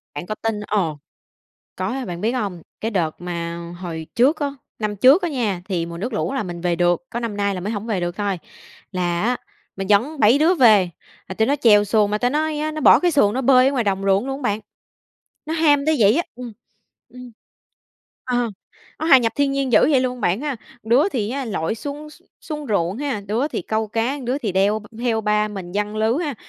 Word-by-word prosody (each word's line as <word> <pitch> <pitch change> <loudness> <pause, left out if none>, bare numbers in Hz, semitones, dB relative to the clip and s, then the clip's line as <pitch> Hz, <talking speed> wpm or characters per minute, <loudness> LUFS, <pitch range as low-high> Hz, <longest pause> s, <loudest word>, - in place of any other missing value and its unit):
Bạn 145 - -5
có 215 - -4
tin 225 -1 -2
ồ! 175 -8 0 0.8
Có, 260 +1 -3
bạn 175 -2 -6
biết 225 +4 0
hông? 200 -9 -3 0.2
Cái 225 - -2
đợt 170 -7 -2
mà 170 -1 -4 0.2
hồi 165 -3 -6
trước 270 +7 +4
á, 290 - +1 0.3
năm 210 -1 -2
trước 270 - +6
á 350 - 0
nha, 220 - -2
thì 170 -4 -1
mùa 170 0 -7
nước 235 +7 -4
lũ 215 - -1
là 270 - -1
mình 175 -3 -6
về 175 0 0
được, 175 +7 +1
có 235 - -3
năm 230 -3 -4
nay 200 -1 0
là 185 - -4
mới 205 +5 -3
hổng 215 +1 -4
về 210 -5 -1
được 175 0 -3
thôi. 200 -3 -1 0.5
Là 175 -2 -1
á, 245 +3 +1 0.4
mình 195 0 -4
dẫn 265 +9 +2
7 220 +6 +5
đứa 325 +5 +4
về, 215 - +5 0.4
mà 190 - -5
tụi 220 +3 +1
nó 285 - +2
chèo 210 -6 +5
xuồng 210 0 +2
mà 210 - 0
ta 245 +3 +1
nói 305 +1 -1
á, 305 +1 -1
nó 310 - -5
bỏ - - +7
cái 355 - +2
xuồng 275 -10 +3
nó 260 - 0
bơi 255 0 +5
ở - - -1
ngoài 250 -4 0
đồng 195 -1 0
ruộng 195 +4 +2
luôn 270 0 -3
á 240 - +2
bạn. 205 +1 -3 0.9
Nó 315 - -2
ham 295 -3 +3
tới 315 - +3
vậy 210 +3 +5
á 340 - +2
ừm, 245 -2 -7 0.6
ừm. 250 +1 -11 0.9
Ờ, 245 -2 0 0.5
nó 315 - -2
hòa 275 -5 +8
nhập 230 -2 0
thiên 285 -1 +2
nhiên 275 -2 -1
dữ 215 - +7
vậy 270 -4 +4
luôn 250 -1 -2
bạn 190 +1 +1
ha. 290 -3 -3 0.3
Đứa 240 - +3
thì 225 - -2
á, 275 +1 -3
lội 210 -4 -2
xuống 290 +6 -7
x 325 - -18 0.2
xuống 300 -2 -6
ruộng 195 -1 0
ha, 275 -7 -2
đứa 230 +8 0
thì 235 - -4
câu 220 +2 -1
cá, 230 +6 -1
đứa 255 +3 -1
thì 220 -9 -3
đeo 200 +3 +2
v 210 - -14
theo 235 -2 0
ba 210 0 +1
mình 190 -4 -7
giăng 210 +1 -2
lưới 220 +2 +2
ha. 290 - -3
220 Hz, 240 wpm, -21 LUFS, 195-270 Hz, 0.9 s, hòa